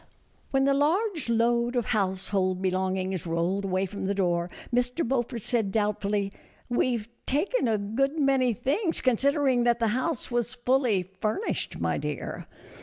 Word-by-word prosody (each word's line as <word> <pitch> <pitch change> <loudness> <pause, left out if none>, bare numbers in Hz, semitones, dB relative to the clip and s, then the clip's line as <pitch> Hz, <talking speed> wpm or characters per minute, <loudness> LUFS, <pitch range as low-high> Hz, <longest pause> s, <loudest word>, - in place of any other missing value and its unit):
When 270 0 +2
the 275 0 +4
large 320 - +1
load 235 +1 +2
of 240 -2 +1
household 190 -3 0
belongings 185 -1 -1
rolled 170 +4 0
away 190 0 0
from 195 +1 -5
the 200 +1 0
door, 175 -2 +1 0.2
Mr. 245 +5 +1
Beaufort 240 -3 -1
said, 225 -5 +1
doubt 210 0 0
fully, 200 -1 -1 0.2
" - - -32
We 245 0 +2
've 215 -1 -8 0.2
taken 305 - +1
a 220 -2 +2
good 260 +9 -1
many 270 -4 +3
things, 325 - 0
consider 275 +3 +2
ing 245 -2 +3
that 240 -1 +4
the 230 -2 +1
house 255 +3 -2
was 240 +1 -1
fully 245 -6 +2
furnished, 200 - -3
my - - 0
dear." - - -5
235 Hz, 165 wpm, -27 LUFS, 195-265 Hz, 0.2 s, the